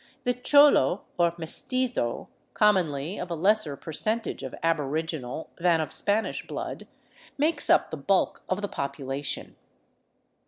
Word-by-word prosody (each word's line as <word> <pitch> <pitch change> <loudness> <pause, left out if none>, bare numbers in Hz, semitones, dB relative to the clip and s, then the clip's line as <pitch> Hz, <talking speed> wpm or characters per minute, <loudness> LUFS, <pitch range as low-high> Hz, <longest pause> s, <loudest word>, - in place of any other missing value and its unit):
The 250 - +1
cholo 250 - +5 0.2
or 170 -1 +3
mestizo, 235 - -1 0.3
commonly 180 -5 +1
of 180 - -5
a 170 - -2
lesser 185 -4 +2
percentage 215 - -1
of 130 - -6
aboriginal 160 -2 -2
than 170 -1 +3
of 155 - -3
Spanish 210 +2 -1
blood, - - -6 0.5
makes 300 +1 +1
up - - +4
the 160 - -5
l)ulk 190 +7 +1
of 185 +2 -1
the - - 0
population. 140 -2 -4
170 Hz, 125 wpm, -26 LUFS, 145-215 Hz, 0.5 s, cholo